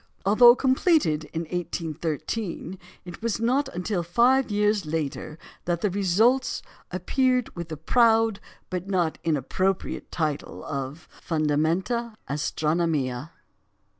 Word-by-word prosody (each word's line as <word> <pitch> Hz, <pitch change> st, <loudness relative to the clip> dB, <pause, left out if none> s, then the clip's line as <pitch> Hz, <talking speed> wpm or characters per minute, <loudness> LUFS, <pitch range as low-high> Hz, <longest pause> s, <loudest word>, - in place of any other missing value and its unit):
Although 240 Hz, +4 st, +8 dB
completed 260 Hz, -, +2 dB
in 165 Hz, +1 st, -4 dB
1813, 170 Hz, +2 st, -4 dB, 0.3 s
it 175 Hz, +1 st, -9 dB
was 230 Hz, -2 st, -1 dB
not 260 Hz, +4 st, +1 dB
until 180 Hz, -1 st, -2 dB
five 240 Hz, +10 st, +3 dB
years 210 Hz, 0 st, +2 dB
later 155 Hz, 0 st, -3 dB, 0.3 s
that 170 Hz, -1 st, -1 dB
the 205 Hz, -, +1 dB
results 210 Hz, +7 st, +2 dB, 0.3 s
appeared 250 Hz, +7 st, 0 dB
with 170 Hz, -1 st, -6 dB
the 155 Hz, -, -5 dB
proud, 225 Hz, -, +3 dB, 0.3 s
but 180 Hz, 0 st, -3 dB
not 180 Hz, -5 st, 0 dB
inappropriate 165 Hz, +5 st, -1 dB
title 155 Hz, -4 st, -3 dB
of 140 Hz, +3 st, -5 dB, 0.2 s
Fundamenta 165 Hz, +9 st, 0 dB
Astronomiæ. 150 Hz, -2 st, -1 dB
180 Hz, 105 wpm, -25 LUFS, 160-225 Hz, 0.3 s, Although